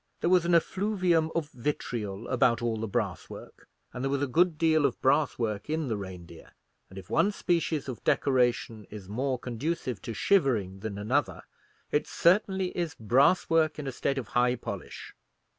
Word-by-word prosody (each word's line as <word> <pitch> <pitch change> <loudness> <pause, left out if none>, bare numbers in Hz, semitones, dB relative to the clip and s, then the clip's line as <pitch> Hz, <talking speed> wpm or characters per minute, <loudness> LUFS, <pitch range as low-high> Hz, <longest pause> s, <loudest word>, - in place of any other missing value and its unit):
There 170 - +1
was 180 -2 +4
an 170 0 +3
effluvium 180 -3 +1
of 160 -3 -1
vitriol 115 -5 -4
about 120 -2 +3
all 115 -2 -1
the 110 +1 -3
brass 100 -5 -3
work, - - -12 0.3
and 125 - -5
there 135 - 0
was 140 0 0
a - - +3
good 165 +5 +2
deal 155 -2 +3
of - - -6
brass 145 +3 +2
work 110 -1 -3
in 155 -3 -1
the 110 - 0
Reindeer: 90 -4 -9 0.4
and 95 - -13
if 95 -1 -9
one 205 - +3
species 165 -7 -1
of 130 -4 -6
decoration 120 -4 +1
is 100 -3 -9
more 130 +6 -1
conducive 125 - -3
to 115 - -6
shivering 115 - +1
than 100 -1 -5
another, 125 +8 -1 0.5
it 150 - +1
certainly 190 +1 +2
is 170 -3 -2
brass 130 - +3
work 160 -1 +2
in 150 - -5
a 135 - -3
state 135 +2 -2
of 120 -7 -4
high 125 +2 +2
polish. 120 - -7
130 Hz, 180 wpm, -28 LUFS, 110-160 Hz, 0.5 s, was